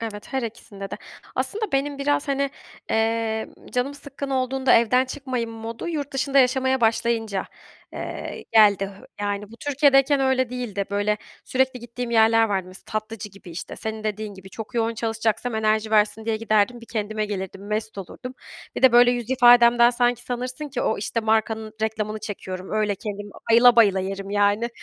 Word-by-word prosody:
Evet, 215 +1 -7
her 265 -2 0
ikisinde 210 -3 -7
de. - - -3 0.4
Aslında 430 -2 -2
benim 280 +1 0
biraz, 285 0 0
hani, 275 0 0 0.4
emm, 225 0 -1
canım 250 +3 -1
sıkkın 280 -1 -7
olduğunda, 260 0 +1
evden 245 +3 +4
çıkmayım 260 -3 -4
modu 225 +4 -6
yurt 295 -4 -3
dışında 270 +1 +1
yaşamaya 260 0 +3
başlayınca, 225 -3 +1 0.5
eee, - - -6
geldi. 200 -3 +5 0.3
Yani, 205 0 -3
bu 230 - -12
Türkiye'deyken 280 0 +3
öyle 260 -2 +1
değildi. 235 -6 -3
Böyle, 205 +1 +1 0.3
sürekli 260 -1 0
gittiğim 240 +1 -6
yerler 225 0 +5
vardı. 190 -2 -1
Mesela, 185 - -12
tatlıcı 215 -1 -4
gibi, 195 -2 -14
işte, 170 +3 -7
senin 220 -1 -5
dediğin 215 -1 -3
gibi 190 0 -13
çok 220 +4 -8
yoğun 230 -1 0
çalışacaksam 225 +1 -1
enerji 220 0 +1
versin 215 +1 +2
diye 225 -1 0
giderdim. 220 +1 +1
Bir 230 - -13
kendime 215 -1 -2
gelirdim, 195 -1 -6
mest 215 0 -3
olurdum. 250 +7 -8 0.4
Bir - - -3
de, 260 -2 +7
böyle, 245 0 +7
yüz 240 -1 -3
ifademden 240 -1 +6
sanki 245 0 +1
sanırsın 250 +4 -4
ki 270 -3 -3
o, 220 - 0
işte, 230 +3 -2
markanın 220 0 0
reklamını 215 -1 -2
çekiyorum, 190 -3 -6
öyle 215 -1 +1
kendim 205 +1 -6 0.2
bayıla 235 +1 +7
bayıla 200 -4 +5
yerim, 195 +1 -5
yani. 205 +3 +2
225 Hz, 165 wpm, -23 LUFS, 210-250 Hz, 0.5 s, de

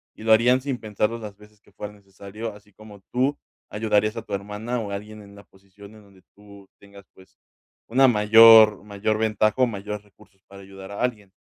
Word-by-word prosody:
y 110 - -13
lo 110 - 0
harían 125 +3 +3
sin 135 -2 -4
pensarlo 105 +1 -2
las 105 -3 -10
veces 105 0 -20
que 100 - -26
fuera 105 +2 -9
necesario, 100 +2 -10
así 105 -1 -19
como 105 -2 -15
tú 135 +4 0 0.3
ayudarías 105 +1 -1
a 115 - -4
tu - - -9
hermana 105 +5 -5
o 105 -2 -7
alguien 105 +2 -8
en 100 0 -16
la 100 - -15
posición 100 +2 -18
en 110 - -16
donde 100 -2 -22
tú 100 -1 -17
tengas, 100 0 -17
pues, 95 - -22 0.5
una 130 +3 +4
mayor 110 -1 +6
mayor 105 +1 -3
ventaja 110 -1 +1
o 125 - +4
mayores 105 -1 -7
recursos 105 -1 -25
para 100 0 -14
ayudar 95 0 -12
a 100 - -7
alguien. 105 -6 -3
105 Hz, 200 wpm, -23 LUFS, 100-110 Hz, 0.5 s, mayor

